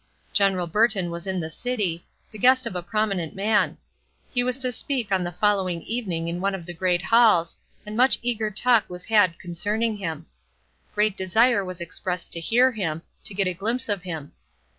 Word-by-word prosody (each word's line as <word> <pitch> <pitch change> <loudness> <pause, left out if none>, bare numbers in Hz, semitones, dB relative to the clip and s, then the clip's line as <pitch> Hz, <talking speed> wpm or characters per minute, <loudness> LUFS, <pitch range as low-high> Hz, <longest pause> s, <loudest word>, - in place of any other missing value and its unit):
General 195 -3 +3
Burton 195 -1 +2
was 170 +2 -6
in 190 -1 -1
the 160 -1 -5
city, 205 -7 -2 0.2
the 215 - -10
guest 255 +3 +5
of 230 - -4
a 180 - -2
prominent 195 -3 -2
man; 205 +2 +1 0.5
he 245 -2 +1
was 250 0 0
to 255 -1 0
speak 245 -3 -3
on 190 -2 +2
the 175 - -3
following 185 -2 0
evening 185 -8 -3
in 170 +1 -3
one 195 0 0
of 175 -3 -8
the 175 - -7
great 180 +1 0
halls, 220 -8 +4 0.3
and 210 0 -7
much 255 +3 +5
eager 225 -3 -1
talk 230 +2 +2
was 180 0 -7
had 205 -6 +3
concerning 210 +6 -2
him; 165 -5 -5 0.7
great 210 -1 +2
desire 210 +4 +3
was 185 -1 -6
expressed 180 +1 -4
to 170 - +2
hear 245 +9 +3
him, 165 -8 -3 0.2
to 200 - -5
get 195 0 +1
a 185 - -1
glimpse 225 +7 -1
of 205 -4 0
him. 160 -5 -6
195 Hz, 190 wpm, -24 LUFS, 175-225 Hz, 0.7 s, guest